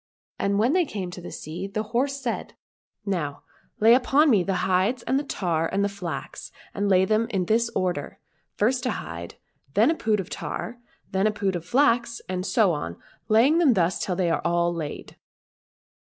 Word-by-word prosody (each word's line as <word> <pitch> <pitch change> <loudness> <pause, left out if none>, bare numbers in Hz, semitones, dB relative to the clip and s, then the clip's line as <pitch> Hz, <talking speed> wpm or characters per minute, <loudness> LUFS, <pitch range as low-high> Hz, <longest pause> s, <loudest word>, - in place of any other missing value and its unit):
And 200 0 +1
when 235 +7 +3
they 365 0 +4
came 195 - -5
to 180 - -8
the 175 - -8
sea 165 +5 -6
the 215 +2 -3
horse 275 +3 +1
said, 245 -4 -4 0.3
'' - - - 0.2
Now 165 -8 -2 0.4
lay 225 +2 +7
upon 270 +4 +4
me 205 -5 +5
the 190 +2 -1
hides 190 +7 +1
and 265 - +1
the - - -3
tar 170 - -1
and 200 +1 +1
the - - 0
flax, 175 -7 -6 0.2
and 200 0 -1
lay 190 -1 +5
them 215 +3 +1
in 190 -5 -1
this 230 +4 +2
order 175 -6 -2 0.2
— - - -46
first 250 +4 +1
a - - +1
hide, 85 +2 -7 0.3
and 135 - -32
then 230 +9 +5
a - - 0
pood 215 -7 0
of 185 - -4
tar, 235 +1 -5
and 240 - -36
then 190 +2 +2
a - - +2
pood 200 -3 -1
of 170 -1 -5
flax, 240 0 +2
and 185 0 -3
so 210 -7 +3
on, 85 - -4 0.3
laying 240 +9 +4
them 285 -9 +4
thus 175 -1 +1
till 180 - -1
they 175 -2 +1
are - - 0
all 170 0 +1
laid." 160 -3 -6
200 Hz, 210 wpm, -25 LUFS, 175-235 Hz, 0.4 s, lay